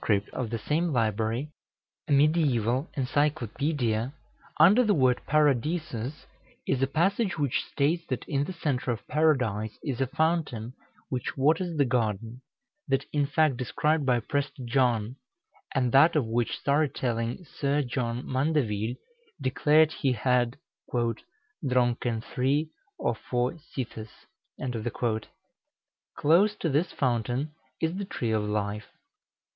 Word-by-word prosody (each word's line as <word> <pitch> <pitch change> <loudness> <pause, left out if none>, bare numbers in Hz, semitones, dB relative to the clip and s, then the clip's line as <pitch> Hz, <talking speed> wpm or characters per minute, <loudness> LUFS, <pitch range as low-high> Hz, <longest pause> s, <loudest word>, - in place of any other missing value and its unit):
of 125 -3 -3
the 115 - -2
same 155 +9 0
library, 115 +2 0 0.6
a - - -4
mediæval 140 -3 +3
encyclopædia, 135 -3 0 0.5
under 195 +11 +7
the 215 -3 +3
word 130 -4 +3
Paradisus 150 -2 0 0.4
is 135 -1 0
a 135 - +3
passage 190 - +1
which 140 -4 0
states 160 +5 +1
that 130 - -3
in 140 -1 0
the - - -5
centre 140 -7 -2
of 115 -2 -3
Paradise 125 -9 +1
is 135 -3 -2
a 135 - +2
fountain 145 -6 -1 0.4
which 125 +1 -3
waters 160 +5 +2
the 140 - +4
garden 115 -1 -1 0.5
that 135 0 +1
in 145 -2 +2
fact 145 -2 +2
described 150 +5 0
by 125 -3 +3
Prester 140 +2 -3
John, 120 -1 +1 0.6
and 125 -3 +2
that 155 +6 +6
of 150 -6 +2
which 115 +1 -1
story 145 +1 +2
telling 120 +6 -2
Sir 145 0 0
John 120 -1 -3
Mandeville 130 -6 0 0.4
declared 150 +4 +4
he 135 -5 0
had 125 +1 +1 0.3
"dronken 125 - -1
3 145 +6 0 0.3
or - - 0
4 125 +2 -1
sithes." 120 -4 -5 0.9
Close 185 +8 +4
to 165 - -2
this 155 +5 +1
fountain 125 +2 -1 0.3
is 165 +3 -1
the 200 - -3
Tree 120 -10 -3
of 110 -1 +2
Life. 105 0 -2
130 Hz, 125 wpm, -28 LUFS, 120-150 Hz, 0.9 s, under